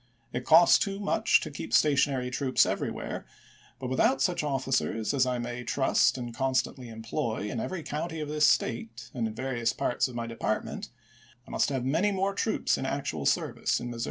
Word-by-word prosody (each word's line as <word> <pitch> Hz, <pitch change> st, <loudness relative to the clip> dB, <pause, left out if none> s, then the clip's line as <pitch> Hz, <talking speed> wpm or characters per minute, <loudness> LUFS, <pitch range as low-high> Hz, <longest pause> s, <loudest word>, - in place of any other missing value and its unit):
It 125 Hz, +1 st, -3 dB
costs 170 Hz, +2 st, +7 dB
too 195 Hz, -1 st, -2 dB
much 205 Hz, -, +2 dB
to -, -, -5 dB
keep -, -, -7 dB
stationary 140 Hz, -3 st, +3 dB
troops 130 Hz, 0 st, +3 dB
everywhere, -, -, -3 dB, 0.5 s
but 130 Hz, -, -5 dB
without 135 Hz, +1 st, +3 dB
such 170 Hz, +4 st, +1 dB
officers 135 Hz, -5 st, 0 dB
as 130 Hz, -2 st, +2 dB
I 125 Hz, -1 st, 0 dB
may 120 Hz, 0 st, -4 dB
trust 135 Hz, +2 st, +2 dB
and 120 Hz, -2 st, -5 dB
constantly 130 Hz, -1 st, -1 dB
employ 110 Hz, -1 st, -3 dB
in 120 Hz, -, -3 dB
every 170 Hz, +7 st, -4 dB
county 160 Hz, +2 st, -4 dB
of 150 Hz, -, -3 dB
this 150 Hz, 0 st, +3 dB
State 225 Hz, 0 st, -1 dB
and 120 Hz, -5 st, -1 dB
in 110 Hz, -, -7 dB
various 120 Hz, -3 st, -1 dB
parts 120 Hz, -, 0 dB
of 125 Hz, -, -10 dB
my 115 Hz, -1 st, -3 dB
de 115 Hz, 0 st, -7 dB
partment, 110 Hz, -, -2 dB, 0.6 s
I -, -, -11 dB
must -, -, +1 dB
have 130 Hz, -3 st, -2 dB
many 165 Hz, +10 st, +2 dB
more 195 Hz, 0 st, 0 dB
troops 215 Hz, +2 st, 0 dB
in 130 Hz, -, -3 dB
actual 80 Hz, -, -2 dB
service -, -, 0 dB
in 120 Hz, -, -5 dB
Missouri. 120 Hz, -, -7 dB
130 Hz, 190 wpm, -28 LUFS, 120-150 Hz, 0.6 s, costs